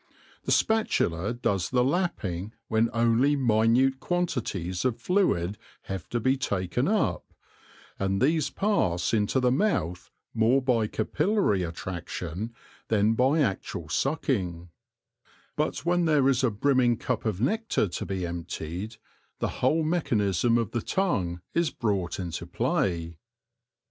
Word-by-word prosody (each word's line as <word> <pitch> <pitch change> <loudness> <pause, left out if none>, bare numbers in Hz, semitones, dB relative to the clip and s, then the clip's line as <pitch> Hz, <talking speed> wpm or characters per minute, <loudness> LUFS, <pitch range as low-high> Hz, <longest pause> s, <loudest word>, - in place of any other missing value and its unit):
The - - -1
spatula 105 - +1
does 115 -6 -1
the 125 -1 +2
lapping 115 - -1 0.2
when 110 +1 +2
only 120 +5 +3
minute 125 +1 +3
quantities 115 - -2
of 130 -3 0
fluid 105 - +1 0.2
have 95 -4 -6
to 120 - -1
be 130 +4 +2
taken 95 -8 -1
up, - - +1 0.8
and 95 0 0
these 150 +3 +2
pass 110 - 0
into 110 +4 +2
the 125 -1 +2
mouth 125 - 0 0.2
more 115 +4 +3
by 125 -5 +1
capillary 110 - +1
attraction 90 +3 -5 0.4
than 110 0 +3
by 135 +7 +3
actual 95 - -2
sucking; 95 - -1 0.9
but - - -2
when 175 0 +2
there 150 -4 +3
is 130 -1 +1
a 130 - +4
brimming 120 +2 +2
cup 125 -2 -2
of 105 -5 -1
nectar 220 - +1
to 85 - -4
be 95 -2 -3
emptied, 85 +4 -5 0.4
the - - -1
whole 155 +6 +3
mechanism 115 - +1
of 115 -4 -1
the 120 - -1
tongue 95 - -1
is 170 -2 +2
brought 100 -9 -2
into 85 -4 -5
play. 85 -3 -1
115 Hz, 130 wpm, -27 LUFS, 95-135 Hz, 0.9 s, a